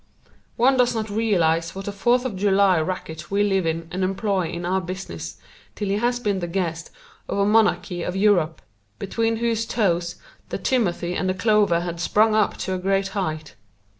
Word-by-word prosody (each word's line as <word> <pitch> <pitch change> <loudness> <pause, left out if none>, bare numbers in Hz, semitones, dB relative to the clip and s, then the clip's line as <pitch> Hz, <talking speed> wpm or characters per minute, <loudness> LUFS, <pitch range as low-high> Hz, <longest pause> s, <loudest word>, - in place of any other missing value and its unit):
One 260 +3 +4
does 245 -1 +3
not 220 -1 -3
realize 170 -7 +1
what 195 +1 -6
a - - -1
Fourth 240 +5 +1
of 240 -6 -3
July 195 -2 +3
racket 160 -2 -5
we 200 +1 +2
live 195 -4 +1
in 165 0 -2
and 185 +1 -2
employ 190 -1 0
in 175 0 -5
our 190 +2 +1
business 185 +2 -6 0.4
till 205 -2 -3
he 200 - +1
has 240 +2 0
been 205 -5 -1
the 175 - -3
guest 170 -2 -3 0.4
of - - -2
a 200 - +3
monarchy 200 -5 +2
of 180 - -3
Europe, 190 -6 +2 0.3
between 225 +3 -1
whose 230 -1 0
toes 175 -5 0 0.3
the - - -3
timothy 180 -8 0
and 185 0 -1
clover 210 -6 +3
have 170 -1 -4
sprung 215 +4 +3
up 215 -1 +2
to 190 - -3
a 185 - -2
great 195 +1 0
height. 155 -6 -3
195 Hz, 185 wpm, -23 LUFS, 175-215 Hz, 0.4 s, One